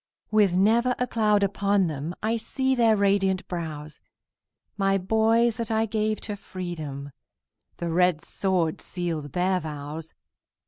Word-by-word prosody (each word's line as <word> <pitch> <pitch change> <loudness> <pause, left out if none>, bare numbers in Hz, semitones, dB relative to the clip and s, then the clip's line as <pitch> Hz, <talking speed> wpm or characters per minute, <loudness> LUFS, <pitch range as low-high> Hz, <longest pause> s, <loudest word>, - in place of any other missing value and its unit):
With 210 -4 +4
never 230 +7 +3
a 250 - 0
cloud 210 -4 +2
upon 200 0 +2
them, 155 +2 -4
I 220 +2 +1
see 265 +4 0
their 230 -4 +4
radiant 195 -2 +1
brows; 155 -4 -6 0.8
My 195 -1 +2
boys 220 +4 +2
that 230 -2 -3
I 220 0 +2
gave 215 0 -1
to 210 - -4
freedom, 155 -8 -6 0.7
The 170 -1 -3
red 180 -1 +3
sword 180 -5 -1
sealed 165 -5 -4
their 185 +1 +1
vows! 155 0 -7
195 Hz, 135 wpm, -26 LUFS, 170-220 Hz, 0.8 s, With